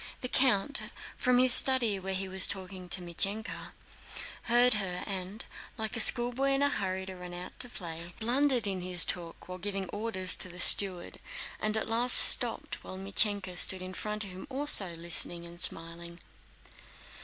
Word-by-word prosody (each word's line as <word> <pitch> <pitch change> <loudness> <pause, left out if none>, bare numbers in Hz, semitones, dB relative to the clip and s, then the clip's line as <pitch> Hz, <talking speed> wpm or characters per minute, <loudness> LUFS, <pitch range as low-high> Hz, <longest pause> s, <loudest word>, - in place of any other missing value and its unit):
The 250 - -3
count, 255 0 +1 0.3
from 250 -1 +1
his 255 -1 +5
study 245 -7 +4
where 190 0 -4
he 190 +1 -3
was 190 0 +1
talking 185 -1 -8
to 185 - -1
Mítenka, 195 +5 -4 0.7
heard 245 +1 +3
her 190 -4 -3
and, 195 +2 -5 0.3
like 220 +1 -5
a - - -3
schoolboy 245 +4 +5
in 275 +1 0
a 285 - +2
hurry 190 -6 -4
to 190 0 -9
run 180 -1 -10
out 180 +1 -8
to 245 - -7
play, 170 -4 -8
blundered 250 +1 +1
in 190 -2 -3
his 180 -1 +5
talk 170 -2 -6
while 185 0 -8
giving 195 0 -4
orders 205 -4 0
to 185 - -1
the 180 0 -12
steward, 185 -1 +3 0.4
and 215 0 -1
at 220 - -2
last 240 +2 +5
stopped, - - +2
while 185 - -9
Mítenka 195 -1 0
stood 185 +1 -1
in 185 0 -8
front 210 +2 -4
of 195 - -9
him 185 +1 -11
also 260 -10 +2
listening 170 +1 0
and 170 +1 -11
smiling. 170 +1 -1
195 Hz, 175 wpm, -29 LUFS, 180-230 Hz, 0.7 s, his